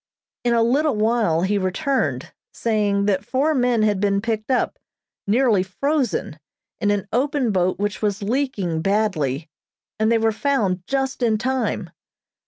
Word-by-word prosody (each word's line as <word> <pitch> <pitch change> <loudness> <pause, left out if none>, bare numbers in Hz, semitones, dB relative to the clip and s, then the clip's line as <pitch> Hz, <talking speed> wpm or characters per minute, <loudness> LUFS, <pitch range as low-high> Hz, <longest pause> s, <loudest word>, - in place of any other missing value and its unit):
In 240 -1 +2
a 230 - +4
little 275 +4 +2
while 215 -6 +1
he 200 +2 +1
returned, 260 +10 -1 0.2
saying 205 -3 0
that 195 -2 +1
four 275 +8 +1
men 245 -5 +2
had 210 -2 +2
been 200 0 +2
picked 220 +1 -3
up, 255 - 0 0.5
nearly 225 -2 +3
frozen, 250 - -1 0.4
in 205 - +1
an 205 -1 0
open 265 -1 +1
boat 185 -1 +1
which 205 +1 -2
was 205 -1 -1
leaking 205 - -1
badly, 165 -8 0 0.5
and 220 +1 +2
they 230 - +4
were 225 0 +2
found 215 -7 0
just 270 -1 -1
in 225 -3 +2
time. 260 +3 -2
215 Hz, 150 wpm, -22 LUFS, 200-255 Hz, 0.5 s, a